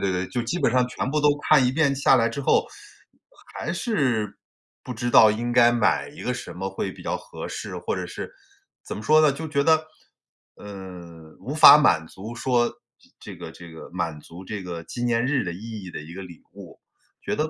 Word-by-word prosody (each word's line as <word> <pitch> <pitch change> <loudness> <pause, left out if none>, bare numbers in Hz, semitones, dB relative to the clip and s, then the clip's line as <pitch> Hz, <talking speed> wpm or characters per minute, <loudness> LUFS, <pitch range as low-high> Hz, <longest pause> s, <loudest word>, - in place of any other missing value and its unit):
对 95 - 0
对， - - -7
就 120 -2 -2
基 155 +10 -3
本 115 - +1
上 125 -1 +3
全 125 - -4
部 150 - 0
都 150 - +4
看 145 -4 +5
一 - - +2
遍 140 0 +2
下 135 -1 +4
来 115 -2 +2
之 115 +5 -5
后， 135 - +2 0.9
还 170 - -4
是 135 - -1 0.4
不 125 - -6
知 120 +1 -2
道 110 -2 +7
应 120 +3 -2
该 120 -1 +6
买 120 0 +1
一 150 - -11
个 125 - -1
什 125 - -7
么 95 +2 -4
会 95 - -4
比 - - -12
较 - - -2
合 - - -9
适。 - - -6
或 - - -3
者 - - -4
是 - - -7 0.5
怎 - - -7
么 105 - -7
说 155 +7 +5
呢， 155 - +5
就 160 +4 -6
觉 140 -2 0
得， 160 +1 +3 0.7
嗯， 90 -5 -11
无 140 - -5
法 155 -1 +10
满 80 - +3
足 105 +8 -9
说 120 -1 +1 0.5
这 - - -10
个 - - -9
这 85 -1 -12
个 80 - -11
满 85 -4 -3
足 85 +5 -12
这 105 -1 -5
个 85 -2 -6
纪 120 +8 -6
念 120 0 +1
日 140 -1 0
的 90 - -3
意 110 +3 -8
义 90 - -8
的 - - -7
一 80 +3 -11
个 95 - -7
礼 85 -3 -12
物， - - -11
我 - - -18 0.4
觉 - - -3
得， 155 +1 -1
120 Hz, 245 characters per minute, -24 LUFS, 95-140 Hz, 0.9 s, 法